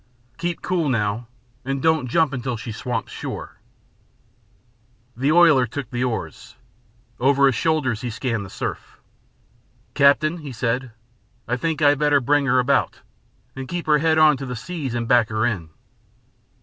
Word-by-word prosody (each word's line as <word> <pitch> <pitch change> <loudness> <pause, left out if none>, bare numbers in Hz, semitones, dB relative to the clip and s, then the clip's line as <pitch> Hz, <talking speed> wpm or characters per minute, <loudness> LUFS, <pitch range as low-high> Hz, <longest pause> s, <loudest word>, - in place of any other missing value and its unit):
Keep 175 0 -3
cool 175 -5 0
now, 115 -1 -1 0.4
and 135 +1 -2
don't 160 -2 +1
jump 160 +2 +2
until 125 -2 -3
she 115 0 -7
swamps 115 +1 -4
sure." - - -7 1.6
The 135 +5 +1
oiler 160 -7 +5
took 130 +1 -6
the 120 0 -1
oars. 120 -3 -5 0.6
Over 140 +2 +4
his 135 - +4
shoulders 130 -4 0
he 125 - -3
scanned 115 -1 -3
the 95 - -9
surf. - - -6 0.9
"Captain," 155 +4 +3
he 145 -4 -8
said, 125 +3 -2 0.6
"I 120 - 0
think 160 +4 -2
I'd 145 -1 +4
better 145 -1 +3
bring 145 +2 +1
her 130 - +3
about, 130 +2 +1 0.5
and 135 0 -6
keep 175 +3 -4
her 150 -1 +3
head 160 +1 +2
on 155 -2 +5
to 135 - -6
the 125 - -4
seas 135 +1 -5
and 115 -1 -2
back 120 -3 +4
her 110 +1 0
in." 95 -9 -2
135 Hz, 160 wpm, -22 LUFS, 120-150 Hz, 1.6 s, oiler